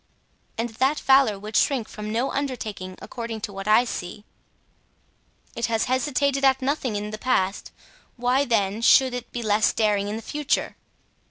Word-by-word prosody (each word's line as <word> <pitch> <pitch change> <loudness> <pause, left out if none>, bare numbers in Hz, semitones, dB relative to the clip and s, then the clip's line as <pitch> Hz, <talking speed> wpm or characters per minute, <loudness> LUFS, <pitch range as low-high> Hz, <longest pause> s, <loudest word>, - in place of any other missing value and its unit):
"And 230 +1 -1
that 260 +6 0
valor 265 -6 +4
would 210 +2 -8
shrink 255 -6 +2
from 210 0 -7
no 235 +4 0
undertaking, 215 -9 -4
according 230 -2 -6
to 205 - -5
what 195 +1 -7
I 215 +3 +5
see." 205 -1 -6 1.3
"It 235 - -1
has 225 -1 0
hesitated 275 +1 0
at 265 -1 +4
nothing 265 -4 -1
in 210 +1 -4
the 215 - -6
past; 200 -6 0 0.4
why, 250 +3 +1
then, 215 -3 0
should 255 +2 +5
it 245 -1 -6
be 240 - -4
less 215 0 +3
daring 210 -2 +1
in 210 - -3
the 225 - -6
future?" 295 +3 -1
230 Hz, 165 wpm, -24 LUFS, 210-260 Hz, 1.3 s, I